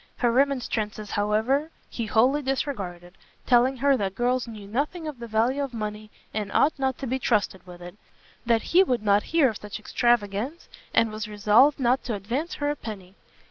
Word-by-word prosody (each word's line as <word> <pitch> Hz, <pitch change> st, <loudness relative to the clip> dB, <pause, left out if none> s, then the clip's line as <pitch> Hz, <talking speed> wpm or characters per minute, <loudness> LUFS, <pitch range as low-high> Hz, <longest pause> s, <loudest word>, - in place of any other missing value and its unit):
Her 240 Hz, -2 st, +2 dB
remonstrances, 235 Hz, -5 st, 0 dB
however, 220 Hz, +9 st, +1 dB, 0.2 s
he 230 Hz, -2 st, -5 dB
wholly 255 Hz, +7 st, +3 dB
disregarded, 195 Hz, -10 st, -4 dB, 0.3 s
telling 255 Hz, +2 st, +4 dB
her 280 Hz, +2 st, +3 dB
that 195 Hz, -3 st, -2 dB
girls 245 Hz, +1 st, 0 dB
knew 215 Hz, -3 st, -9 dB
nothing 300 Hz, -, -2 dB
of 295 Hz, -5 st, -6 dB
the 235 Hz, -, -7 dB
value 230 Hz, +5 st, +1 dB
of 270 Hz, -4 st, -4 dB
money, 215 Hz, -1 st, -5 dB, 0.2 s
and 210 Hz, -2 st, -3 dB
ought 305 Hz, -, +4 dB
not 265 Hz, -1 st, 0 dB
to 275 Hz, -, -5 dB
be 260 Hz, +1 st, -1 dB
trusted 205 Hz, -6 st, 0 dB
with 175 Hz, 0 st, -11 dB
it; 175 Hz, +1 st, -10 dB, 0.5 s
that 230 Hz, -1 st, +2 dB
he 365 Hz, -, +8 dB
would 250 Hz, -, +1 dB
not 205 Hz, 0 st, +4 dB
hear 325 Hz, -4 st, +4 dB
of 215 Hz, -, -5 dB
such 210 Hz, -1 st, -7 dB
extravagance, 235 Hz, +6 st, 0 dB, 0.2 s
and 225 Hz, -1 st, +2 dB
was 215 Hz, +1 st, -5 dB
resolved 215 Hz, +8 st, +4 dB
not 250 Hz, 0 st, +2 dB
to 235 Hz, -, -2 dB
advance 245 Hz, -, -3 dB
her 290 Hz, 0 st, -1 dB
a -, -, -3 dB
penny. 195 Hz, -8 st, -9 dB
235 Hz, 185 wpm, -25 LUFS, 210-270 Hz, 0.5 s, he